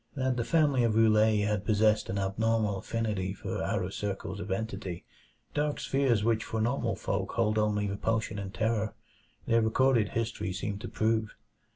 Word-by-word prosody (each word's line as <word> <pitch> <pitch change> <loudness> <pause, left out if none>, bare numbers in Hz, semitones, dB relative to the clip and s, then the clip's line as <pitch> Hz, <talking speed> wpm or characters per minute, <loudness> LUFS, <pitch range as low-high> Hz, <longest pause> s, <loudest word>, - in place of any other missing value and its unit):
That 130 -2 0
the 120 - 0
family 145 -2 +3
of 115 -2 +2
Roulet 110 -1 +4
had 105 -2 0
possessed 110 0 +2
an 95 - -2
abnormal 105 +1 0
affinity 105 -4 -2
for - - -4
outer - - -1
circles 100 0 -4
of 95 - -6
entity 95 -3 -4 0.5
dark 150 0 0
spheres 130 -6 +1
which 115 -1 +2
for 110 - -3
normal 115 0 0
folk 100 0 -2
hold 110 -2 +1
only 105 -1 +1
repulsion 110 +1 -1
and 95 -1 -5
terror 110 +1 -1 0.5
their 115 0 +3
recorded 115 -1 +3
history 110 -4 -2
seemed 100 +2 -4
to 120 - -5
prove. 110 -1 0
110 Hz, 165 wpm, -29 LUFS, 100-115 Hz, 0.5 s, Roulet